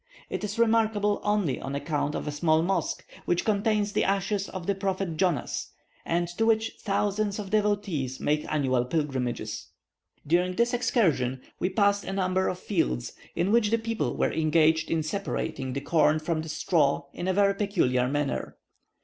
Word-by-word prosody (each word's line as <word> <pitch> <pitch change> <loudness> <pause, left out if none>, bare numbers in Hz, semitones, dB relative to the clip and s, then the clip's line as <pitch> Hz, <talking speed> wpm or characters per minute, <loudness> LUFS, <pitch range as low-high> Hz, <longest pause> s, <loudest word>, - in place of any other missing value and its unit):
It - - -3
is 210 +1 -3
remarkable 220 -3 +2
only 205 -10 0
on 135 +1 -4
account 145 0 -1
of - - -4
a - - -1
small 155 +2 +2
mosque, 190 +2 -1 0.2
which 175 - +1
contains 210 -1 +1
the - - +2
ashes 195 +1 0
of 185 -3 -6
the 200 - +1
prophet 190 -3 -2
Jonas, 175 -4 -1 0.3
and 175 +1 0
to 225 - +3
which 225 0 +2
thousands 205 0 0
of 200 -2 -6
devotees 205 -11 0
make 150 +1 +1
annual 130 -5 +2
pilgrimages. 135 -4 -2 0.6
During 180 +4 +2
this 235 +3 +2
excursion 170 - +1 0.2
we 180 - +1
passed 200 +1 +2
a 195 - -4
number 190 -1 +1
of 180 - -2
fields, 165 - -1 0.2
in 185 +3 +1
which 225 -2 +4
the 230 - +3
people 230 0 -2
were - - +1
engaged 160 0 +3
in 160 -1 +1
separating 155 -6 -3
the 140 - -3
corn 155 0 +3
from 155 +1 -1
the 160 - -7
straw 155 -2 +1
in 175 - -4
a 190 - +2
very 200 +1 +4
peculiar 130 -12 +1
manner. 145 +1 -2
185 Hz, 170 wpm, -27 LUFS, 150-205 Hz, 0.6 s, which